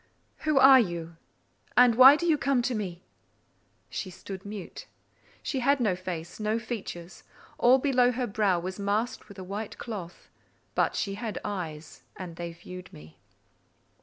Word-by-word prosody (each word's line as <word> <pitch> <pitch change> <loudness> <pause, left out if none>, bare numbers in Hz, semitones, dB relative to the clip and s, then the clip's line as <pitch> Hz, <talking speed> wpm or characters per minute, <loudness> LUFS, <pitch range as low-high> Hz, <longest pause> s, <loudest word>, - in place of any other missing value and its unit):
"Who 300 - +3
are 265 0 +9
you? 170 -6 -3 0.6
and 245 -1 +7
why 260 +4 +9
do 345 - -3
you 325 -3 +4
come 275 -4 +1
to 250 - 0
me?" 185 -5 -4 0.9
She 190 - -4
stood 190 +1 -9
mute. 205 -3 -8 0.6
She 270 - -2
had 275 +3 +3
no 210 -7 +1
face—no 185 +4 -3
features: 205 -6 -7 0.4
all 250 +2 +6
below 255 -2 +3
her 250 +1 -2
brow 200 -4 +1
was 185 +3 -6
masked 210 +3 -2
with 200 - -12
a 190 - -7
white 200 +3 -6
cloth; 195 -7 -7 0.5
but - - +1
she 200 - -2
had 220 +1 -5
eyes, 165 -6 -6
and 180 -3 -8
they 170 0 -5
viewed 180 +2 -11
me. 75 +1 -15
205 Hz, 155 wpm, -28 LUFS, 180-245 Hz, 0.9 s, are